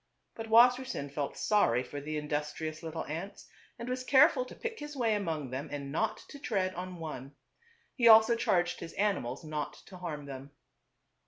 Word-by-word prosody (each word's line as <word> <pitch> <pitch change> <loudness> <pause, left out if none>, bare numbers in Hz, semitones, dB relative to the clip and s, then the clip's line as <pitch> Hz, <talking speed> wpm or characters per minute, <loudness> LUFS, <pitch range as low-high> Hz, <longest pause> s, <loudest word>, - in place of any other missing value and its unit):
But 225 0 -7
Wassersein 240 - +4
felt 145 0 -3
sorry 125 - +2
for 145 +3 -7
the 155 +2 -4
industrious 150 +1 -3
little 165 0 -5
ants 165 +7 -6 0.3
and 235 0 -7
was 255 0 -2
careful 265 0 +5
to - - -11
pick 470 -1 -5
his 295 0 -7
way 230 -3 +2
among 160 -10 -2
them 140 +4 -4
and 140 -1 -5
not 215 +9 -1
to 285 - -10
tread 190 -8 -1
on 185 +1 -6
one. 145 -5 -7 0.6
He 235 -3 +3
also 225 +1 +8
charged 175 -5 +1
his 165 - -8
animals 185 - -1
not 155 -2 -4
to 185 - -11
harm 155 -5 -5
them. 140 0 -9
175 Hz, 175 wpm, -31 LUFS, 150-225 Hz, 0.6 s, also